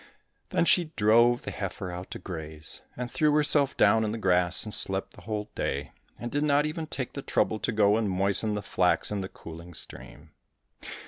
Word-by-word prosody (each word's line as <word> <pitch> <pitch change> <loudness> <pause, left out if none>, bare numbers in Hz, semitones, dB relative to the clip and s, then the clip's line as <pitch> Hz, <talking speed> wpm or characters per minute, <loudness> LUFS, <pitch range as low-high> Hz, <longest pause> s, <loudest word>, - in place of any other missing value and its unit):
Then - - +2
she 175 0 +4
drove 120 +2 +4
the - - -5
heifer 95 -1 -5
out 90 +1 -7
to - - -6
graze, 80 -3 -7 0.2
and 125 0 -4
threw 150 -1 +2
herself 145 -2 +3
down 110 +2 +4
in 105 - -1
the 115 - -3
grass, 90 -3 +3
and 105 - -3
slept 95 0 -1
the - - -14
whole 105 -1 -4
day, 70 0 -3 0.3
and 120 0 -6
did 145 - 0
not 145 0 +3
even 155 +1 -4
take 130 -5 -4
the 140 - -5
trouble 110 -4 0
to 115 - -1
go 105 -1 +3
and 110 -3 0
moisten 100 +3 +1
the 105 - -4
flax 90 0 +1
in 105 -1 -2
the 95 - -5
cooling 85 +1 -11
stream. - - -7
105 Hz, 200 wpm, -28 LUFS, 95-120 Hz, 0.3 s, she